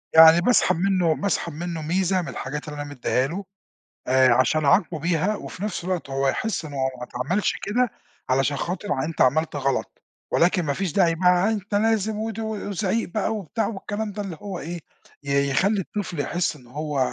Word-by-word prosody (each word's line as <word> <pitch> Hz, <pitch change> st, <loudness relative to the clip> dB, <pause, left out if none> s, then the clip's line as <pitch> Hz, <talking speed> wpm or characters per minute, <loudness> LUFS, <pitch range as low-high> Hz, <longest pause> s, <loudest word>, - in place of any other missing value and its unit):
يعني 160 Hz, +1 st, +9 dB
باسحب 245 Hz, +7 st, +3 dB
منّه 180 Hz, -2 st, +2 dB
باسحب 170 Hz, +1 st, -1 dB
منّه 170 Hz, +1 st, -4 dB
ميزة 185 Hz, +4 st, +1 dB
من 170 Hz, -, -7 dB
الحاجات 150 Hz, +4 st, -5 dB
اللي 150 Hz, -1 st, -5 dB
أنا 145 Hz, -, -6 dB
مدِّيها 130 Hz, -1 st, 0 dB
له، 185 Hz, +7 st, -5 dB, 0.6 s
آآ، 130 Hz, -1 st, +5 dB
عشان 145 Hz, +5 st, +2 dB
أعاقبه 170 Hz, +1 st, +3 dB
بيها 170 Hz, +6 st, +1 dB
وفي 200 Hz, -, -8 dB
نفْس 210 Hz, -5 st, -3 dB
الوقت 180 Hz, -5 st, -3 dB
هو 135 Hz, 0 st, 0 dB
يحس 220 Hz, +3 st, -1 dB
إنّه 145 Hz, -2 st, -8 dB, 0.2 s
ما -, -, -6 dB
اتعملش 140 Hz, +12 st, -1 dB
كده، 245 Hz, +4 st, +1 dB, 0.4 s
علشان 135 Hz, +2 st, +2 dB
خاطر 175 Hz, -5 st, -2 dB
أنت 165 Hz, 0 st, -3 dB
عملت 155 Hz, +5 st, +3 dB
غلط، 135 Hz, -1 st, -2 dB, 0.3 s
ولكن 180 Hz, +1 st, +3 dB
ما 145 Hz, -3 st, 0 dB
فيش 185 Hz, +2 st, -2 dB
داعي 170 Hz, -1 st, +3 dB
بقى 180 Hz, +3 st, +3 dB
أنت 205 Hz, -1 st, -3 dB
لازم 220 Hz, 0 st, +1 dB
ودي 220 Hz, 0 st, -3 dB
وزعيق 210 Hz, -1 st, -2 dB
بقى 215 Hz, +3 st, -1 dB
وبتاع 215 Hz, +2 st, -2 dB
والكلام 210 Hz, 0 st, -4 dB
ده، 205 Hz, +1 st, -5 dB
اللي 190 Hz, -5 st, -6 dB
هو 195 Hz, -4 st, -5 dB
إيه 175 Hz, +2 st, -5 dB, 0.4 s
ي 140 Hz, 0 st, +1 dB
يخلّي 195 Hz, +9 st, +2 dB
الطفل 185 Hz, -3 st, -5 dB
يحس 175 Hz, +3 st, -1 dB
إنّ 125 Hz, -4 st, -16 dB
هو 150 Hz, +2 st, -3 dB
175 Hz, 180 wpm, -24 LUFS, 145-200 Hz, 0.6 s, يعني